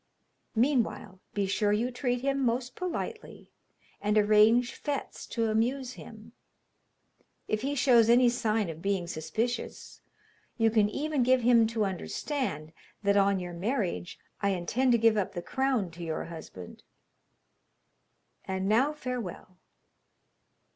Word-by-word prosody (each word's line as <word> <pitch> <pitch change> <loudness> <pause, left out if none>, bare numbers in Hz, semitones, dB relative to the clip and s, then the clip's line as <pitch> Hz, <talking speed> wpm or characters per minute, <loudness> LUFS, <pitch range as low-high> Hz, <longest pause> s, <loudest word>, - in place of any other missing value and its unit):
Meanwhile, 230 -6 0 0.2
be 200 -1 +1
sure 205 +2 +1
you 230 +4 0
treat 245 -1 -1
him 275 +1 0
most 250 +1 -1
politely, 370 +5 -5 0.5
and 210 +1 +1
arrange 215 +3 +4
fêtes 285 -2 -4
to 225 -2 0
amuse 250 +4 0
him. 220 -1 -12 1.2
If 215 - -1
he 280 +2 -2
shows 240 -4 +5
any 245 +1 +6
sign 225 -4 +1
of 160 0 -11
being 195 -2 0
suspicious, 170 +10 -4 0.6
you 225 -1 +3
can 210 -2 +3
even 295 +4 -1
give 255 +1 +4
him 235 -1 +5
to 220 -2 0
understand 190 - -3 0.3
that, 200 0 +3
on 200 -1 +3
your 175 -1 -6
marriage, 190 -1 -2 0.2
I 200 - +2
intend 245 +9 +1
to - - +5
give 225 -1 +4
up 195 -2 -1
the 175 - -3
crown 260 -9 0
to 170 +1 -9
your 160 -1 -3
husband. 160 - -10 1.7
And 190 0 -2
now 255 +8 +3
farewell!' 240 - -6
225 Hz, 135 wpm, -29 LUFS, 195-250 Hz, 1.7 s, any